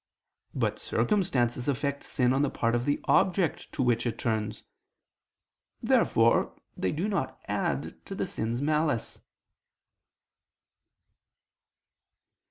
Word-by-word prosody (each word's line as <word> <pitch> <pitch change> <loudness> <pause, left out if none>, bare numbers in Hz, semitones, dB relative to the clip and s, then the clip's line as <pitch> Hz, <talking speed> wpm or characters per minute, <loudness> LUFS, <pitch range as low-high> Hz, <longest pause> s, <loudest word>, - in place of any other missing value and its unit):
But - - 0
circumstances 125 - 0
affect 140 +1 -1
sin 125 -1 +1
on 135 - +2
the 145 - +2
part 115 0 0
of 120 0 0
the 145 - +1
object 185 -3 +2
to 135 - 0
which 120 -1 +2
it 115 - -3
turns. 110 -2 -2 1.2
Therefore - - +3 0.2
they 95 - -1
do 170 +7 -1
not 205 -2 -2
add - - -2
to - - -5
the - - -1
sin's 115 +4 -3
malice. 150 -5 0
130 Hz, 110 wpm, -28 LUFS, 120-150 Hz, 1.2 s, Therefore